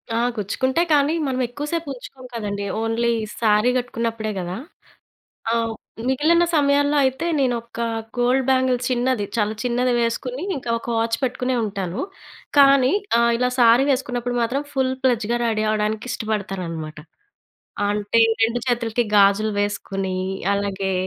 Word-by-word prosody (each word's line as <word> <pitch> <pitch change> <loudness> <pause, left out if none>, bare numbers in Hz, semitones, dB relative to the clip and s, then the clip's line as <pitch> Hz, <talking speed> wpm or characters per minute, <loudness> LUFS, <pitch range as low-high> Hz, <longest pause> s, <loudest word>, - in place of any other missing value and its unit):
ఆ! - - +1 0.2
గుచ్చుకుంట‌యి. 260 - 0
కానీ, 290 +1 +3
మనం 260 -1 -1
ఎక్కువసేపు 295 +6 -4
ఉంచుకోము 255 0 -11
కదండీ. 205 -3 -3 0.2
ఓన్లీ 225 +1 +1 0.3
శారీ 215 +1 +3
కట్టుకున్నప్పుడే 230 -3 -2
కదా. 180 0 -4 1.0
ఆ! - - +2 0.6
మిగిలిన 315 +6 +3
సమయాల్లో 285 0 +3
అయితే 265 +5 0
నేను 260 -3 +2
ఒక 235 0 -10 0.4
గోల్డ్ 250 +2 +2
బ్యాంగిల్ 260 -1 +3
చిన్నది, 250 -3 0
చాలా 215 -1 0
చిన్నది 250 0 +1
వేసుకొని, 245 +4 -2
ఇంకా 245 -3 -5
ఒక 230 - -12
వాచ్ 230 0 +1
పెట్టుకునే 255 0 -1
ఉంటాను. 195 -4 -4 0.6
కానీ 275 -2 +6 0.3
ఆహ్, 235 0 +4
ఇలా 250 +1 +1
శారీ 240 +2 +6
వేసుకున్నప్పుడు 245 -2 -1
మాత్రం 260 +5 0
ఫుల్ 265 -2 +1
ప్లెడ్జ్‌గా 240 -2 +1
రెడీ 220 -2 0
అవ్వడానికి 215 +2 -1
ఇష్టపడతాననమాట. 185 -9 -4 0.9
అంటే 205 +2 0 0.2
2 230 +2 +2
చేతులకి 240 -1 0
గాజులు 200 +2 +4
వేసుకొని, 195 -2 -2 0.4
అలాగే 200 -1 -2
235 Hz, 130 wpm, -22 LUFS, 210-260 Hz, 1.0 s, కానీ